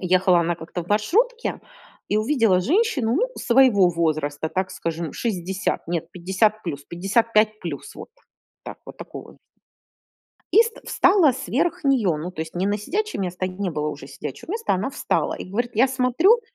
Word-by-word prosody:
Ехала 185 0 +3
она 170 0 0
как-то 170 +2 -6
в - - -18
маршрутке 450 - +1 0.5
и 210 - +1
увидела 220 -5 +3
женщину, 285 - +1
ну, - - +1
своего 235 -7 +5
возраста, 155 -2 -1
так 185 +1 -2
скажем, 165 -2 -4
60, 190 -4 -2
нет, 170 -2 -3
50 200 +5 +1
плюс, 145 -5 -5
55 215 +4 +1
плюс 160 -5 -6
вот - - -9 0.6
так, - - -8
вот - - -10
такого. - - -10 1.2
И 450 - +8
ст 460 -1 -4
встала 360 -7 +4
сверх 270 - -1
неё, 245 - +2
ну 175 +4 -5
то 160 - -5
есть 160 +2 -7
не 180 - 0
на 205 - 0
сидячее 420 - -3
место, 185 0 -2
где 185 - -9
не 200 -2 -1
было 150 -2 -2
уже 145 -2 -8
сидячего 150 - -8
места, 455 - 0
она 190 +7 -1
встала - - -1
и - - -6
говорит: 240 +4 -2
я 255 +5 +5
смотрю, 265 - +3
200 Hz, 170 wpm, -23 LUFS, 175-260 Hz, 1.2 s, И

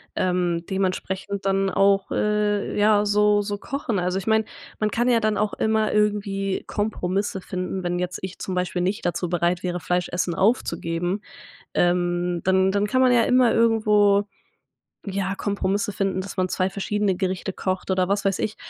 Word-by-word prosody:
ähm, 180 -2 0
dementsprechend 190 +1 -2
dann 195 0 +1
auch, 195 0 +2
äh, 210 -1 0
ja, 210 0 +4
so 210 0 +3
so 205 0 -3
kochen. 275 -2 -3
Also, 180 +1 0
ich 195 - -9
meine, 220 0 +3 0.3
man 215 -1 0
kann 240 +2 +1
ja 235 -2 +4
dann 215 -1 0
auch 210 -1 0
immer 220 0 +1
irgendwie 200 -2 0
Kompromisse 200 -2 -2
finden, 185 +1 -4
wenn 175 0 -1
jetzt 180 0 -3
ich 190 0 -6
zum 190 - -5
Beispiel 180 0 -1
nicht 190 +3 -2
dazu 175 +1 -2
bereit 175 +1 0
wäre, 180 -1 -2
Fleisch 180 +1 -1
essen 175 -1 -1
aufzugeben, 180 -3 0 0.5
ähm, 175 0 +1
dann 190 0 +3
dann 200 +1 +1
kann 255 +5 +1
man 255 -1 +5
ja 240 -1 +5
immer 250 -1 +4
irgendwo, 210 -3 +3 0.8
ja, 195 -1 -2
Kompromisse 200 0 -1
finden, 195 -1 -1
dass 195 +1 -8
man 185 0 +1
2 185 +1 0
verschiedene 200 0 -1
Gerichte 185 +1 -2
kocht 185 0 -3
oder 185 -1 +1
was 200 +1 0
weiß 195 -1 +1
ich. 215 - -2
195 Hz, 175 wpm, -23 LUFS, 180-210 Hz, 0.8 s, man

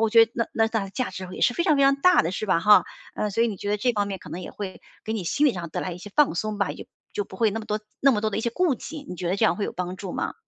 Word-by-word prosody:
我 225 -1 +2
觉 230 +1 +8
得 225 - -29
那 230 - 0
那 225 -1 +3
大 220 -3 -2
价 245 +3 -3
值 185 0 -7
也 - - -7
是 245 - +3
非 340 - +1
常 310 -5 +4
非 280 - +3
常 275 0 +5
大 360 +6 +5
的， 165 - -1
是 215 - -3
吧 185 - +3
哈？ 210 +3 +6 0.3
呃， 210 - -1
所 230 +3 +1
以 - - +1
你 210 - -4
觉 205 +2 -4
得 210 - +2
这 245 +4 +1
方 205 -2 0
面 195 -1 -4
可 - - -13
能 180 - -5
也 180 - -7
会 195 -2 -7 0.2
给 220 - -2
你 210 -5 -3
心 295 - +2
理 275 - +4
上 175 -4 -5
带 - - -3
来 185 - -3
一 170 - -8
些 205 +3 -10
放 295 - +4
松 215 +4 -2
吧， 200 -2 +1
也 - - -8
就 - - -41 0.2
就 205 - -2
不 190 - -12
会 220 +1 +3
那 225 +3 -3
么 215 - -10
多 210 0 -2 0.2
那 275 - +6
么 210 - 0
多 215 0 0
的 205 - -2
一 - - 0
些 235 - -1
顾 335 +3 +2
忌， 290 +4 -8
你 - - -5
觉 175 0 -3
得 185 - 0
这 220 - +2
样 - - +3
会 205 - -1
有 - - -4
帮 180 0 -4
助 190 -2 -6
吗？ - - -3
210 Hz, 400 characters per minute, -25 LUFS, 190-235 Hz, 0.3 s, 觉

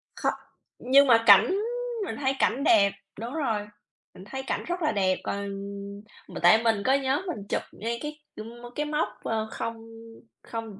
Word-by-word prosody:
Kho - - 0 0.5
nhưng 275 +3 +5
mà 230 -2 +5
cảnh 205 - +7 0.5
mình - - -4
thấy 270 -1 0
cảnh 260 +3 +1
đẹp. 200 -8 +5 0.3
Đúng 235 +3 -5
rồi, 225 -10 -1 0.5
mình 185 - -12
thấy 265 +5 -6
cảnh - - -3
rất 350 +1 -3
là 310 - +2
đẹp. 190 -2 +1
Còn 200 0 -3 0.8
mà - - -7
tại 220 +1 +6
mình 220 -3 +2
có 265 - +4
nhớ 275 +2 +1
mình 210 - -5
chụp - - 0
ngay 235 +2 -4
cái, 300 0 -6 0.2
ưm, 230 +2 -9
mơ 240 - -9
cái 300 - -1
mốc, 300 +1 0 0.2
ơ, 220 -1 -1
không 230 0 -4 0.7
không 225 -3 -7
235 Hz, 185 wpm, -27 LUFS, 215-275 Hz, 0.8 s, cảnh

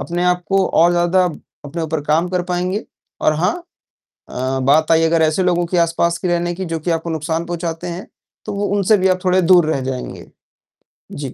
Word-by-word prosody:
अपने 175 +1 -2
आप 180 0 +1
को 195 -1 +2
और 170 +1 +4
ज़्यादा 175 +1 +2 0.4
अपने 160 +4 -5
ऊपर 160 -1 -2
काम 160 +4 +1
कर 180 0 -1
पाएँगे। 185 +4 -2 0.4
और - - +3
हाँ, 165 - +1 0.7
अ, 130 +1 -2
बात 150 +4 +3
आई 165 0 +4
अगर 165 0 +2
ऐसे 155 +4 +2
लोगों 175 -1 +1
के 175 +1 -1
आसपास 170 0 +1
के 180 - -3
रहने 175 0 0
की 190 +2 -5
जो 165 -2 -3
कि 175 - -3
आपको 165 0 -2
नुकसान 160 +1 -2
पहुँचाते 170 0 -4
हैं। 175 +2 -6 0.4
तो - - -5
वो 200 0 -1
उनसे 205 +2 +3
भी 190 0 +2
आप 185 - +2
थोड़े 185 0 +3
दूर 175 -2 +5
रह 135 - -2
जाएँगे। 130 -1 -6 0.8
जी। 140 -3 -6
170 Hz, 205 wpm, -18 LUFS, 160-180 Hz, 0.8 s, दूर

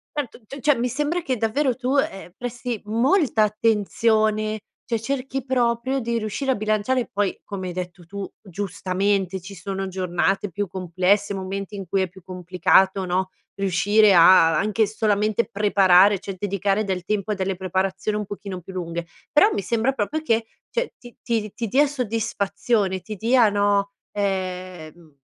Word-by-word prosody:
Certo. 270 -4 -4
C 275 +6 -9
cioè 295 +3 +3
mi 245 +1 -1
sembra 295 +7 -1
che 260 -7 -2
davvero 250 +5 +1
tu, 255 +2 -1
ehm, 195 -9 -1
presti 245 -2 -4
molta 235 - +2
attenzione 215 0 +1 0.2
cioè, 230 -2 -2
cerchi 270 +2 -3
proprio 255 +1 0
di 235 0 -1
riuscire 225 +6 -2
a 260 - +2
bilanciare 215 +4 0
poi 205 -1 -1
come 190 -2 -5
hai 180 - -5
detto 175 -1 -6
tu 200 +2 -6
giustamente 190 0 -1
ci 195 +2 -10
sono 195 +2 -4
giornate 185 +2 0
più 205 +4 -2
complesse, 185 +3 0
momenti 195 +1 -5
in 195 -1 -6
cui 195 +2 +1
è 185 - -1
più 190 +1 -15
complicato, 185 +1 +2
no, 185 +1 0 0.3
riuscire 200 +2 +4
a 165 -2 +7
anche 215 +2 +2
solamente 215 +1 0
preparare 200 -1 +5
cioè, 195 +1 -6
dedicare 200 +1 0
del 185 -3 -3
tempo 210 0 -1
a - - +2
delle 190 -1 -2
preparazioni 190 +3 -1
un 210 - -3
pochino 195 -2 -6
più 190 +3 -11
lunghe, 170 -2 -4 0.2
però 400 +9 +6
mi - - -1
sembra 235 +5 0
proprio 285 +7 -2
che, 230 -6 +1 0.3
cioè, 485 +1 -2
ti 240 -1 -13
ti 230 -1 +1
di 210 -1 -9
ti 230 - -3
dia 280 +7 +4
soddisfazione, 205 -5 -1
ti 215 +3 -7
dia 230 +3 +4
no, 200 -1 +1 0.2
ehm, 185 -5 -4
205 Hz, 165 wpm, -23 LUFS, 190-230 Hz, 0.3 s, a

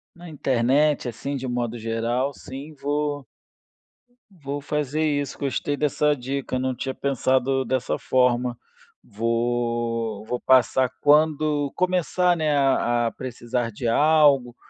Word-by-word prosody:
Na 175 0 -12
internet, 135 +1 +1
assim, 130 +5 -4
de 130 -1 -4
um - - -3
modo 120 -1 -2
geral, 115 +4 -1
sim, 140 +5 -9
vou 145 -1 -2 1.1
vou 145 -5 -6
fazer 150 +1 -2
isso, 145 -2 -1
gostei 140 +1 -1
dessa 150 0 +1
dica, 130 0 -3
não 130 -1 -1
tinha 130 +1 -4
pensado 130 0 0
dessa 130 -1 -1
forma, 125 -1 +1 0.5
vou 115 -1 -1
vou 125 +2 -3
passar 130 0 +3
quando 150 -1 +3
começar, 180 -1 +1
né, 155 -2 +1
a 120 -4 +2
a - - -2
precisar 120 -1 -4
de 115 +3 -4
algo 145 -2 +4
130 Hz, 125 wpm, -24 LUFS, 120-145 Hz, 1.1 s, algo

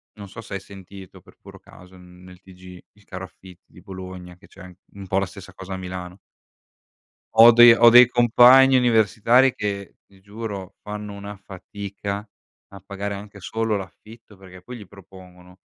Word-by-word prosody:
Non 100 -2 -12
so 115 - -12
se 105 - -12
hai 100 - -4
sentito 95 -1 -14
per - - -22
puro - - -16
caso 90 +1 -18
n 90 0 -18
nel 90 -1 -16
TG, 90 -1 -15
il 100 0 -26
caro 95 -1 -9
affitti 95 -1 -19
di 90 - -17
Bologna 95 -2 -11
che - - -21
c'è - - -18
an 90 -1 -13 0.2
un 100 -1 -11
po' 95 +1 -1
la 100 - -2
stessa 95 0 -14
cosa 95 0 -10
a - - -5
Milano 90 0 -9 1.2
ho 115 +1 +8
dei 120 0 +7
ho 120 0 +5
dei 125 +1 +7
compagni 125 +2 +5
universitari 120 +2 +2
che 100 -1 -6
ti 95 -1 -24
giuro 100 -2 -9
fanno 105 0 -8
una 100 +1 -10
fatica 100 +1 -9 0.4
a 100 - -13
pagare 100 +1 -6
anche 100 0 -12
solo 110 +2 -3
l'affitto, 105 +3 -14
perché 95 -1 -16
poi 125 -1 -11
gli 105 -4 -13
propongono, 90 -1 -18
100 Hz, 180 wpm, -21 LUFS, 95-110 Hz, 1.2 s, ho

